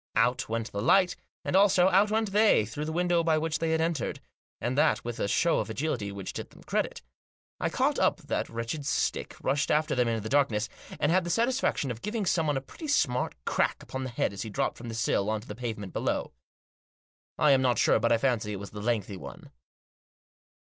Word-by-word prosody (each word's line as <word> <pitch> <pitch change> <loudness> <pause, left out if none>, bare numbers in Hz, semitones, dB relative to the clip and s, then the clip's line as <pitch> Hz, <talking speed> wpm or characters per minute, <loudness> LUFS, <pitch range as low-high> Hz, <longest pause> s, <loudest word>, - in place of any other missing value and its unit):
Out 125 +2 +2
went 115 0 -2
the 100 - -3
light, 180 - +4 0.3
and, - - -1
also, 190 -2 +5
out 195 +3 +4
went 220 -1 0
they, 210 - +4
through 130 +8 -5
the 160 - -3
window 175 0 +2
by 160 -1 +3
which 155 -1 -1
they 165 - 0
had 160 0 +1
entered, 165 -5 -1 0.4
and 125 +2 -2
that 115 -5 +2
with 120 -1 -4
a - - 0
show 170 +10 +2
of - - -3
agility 110 -5 -2
which 100 -1 -6
did - - -6
them - - -17
credit. - - -2 0.6
I - - 0
caught - - +1
up - - +3
that - - -2
wretched 115 +6 -4
stick, - - -1
rushed 140 +2 +1
after 155 +1 +2
them 125 -1 +2
in 115 -2 -1
the - - -4
darkness, 115 -5 +1 0.3
and 150 - +2
had 185 +1 +3
the 175 - -4
satisfaction 230 - +1
of 115 -1 -7
giving 210 -1 -2
someone 160 -6 +1
a - - -2
pretty 305 - -9
smart 130 - +1
crack - - 0
upon 130 0 -5
the 130 - -4
head 120 -4 -1
as 100 - -6
he 110 - -4
dropped 100 - -2
from 120 0 -7
the 115 - -5
sill 105 -3 +1
on 110 0 0
to 115 - -15
the - - -5
pavement 110 -4 -5
below. - - -2 1.0
I 150 - +4
am 135 -1 +5
not 125 -2 +2
sure, - - +4
but 115 - +1
I 115 - +5
fancy 115 -4 0
it 100 - -5
was 100 - -8
the 105 - -7
lengthy 105 -3 -1
one. - - -10
130 Hz, 225 wpm, -28 LUFS, 115-165 Hz, 1.0 s, also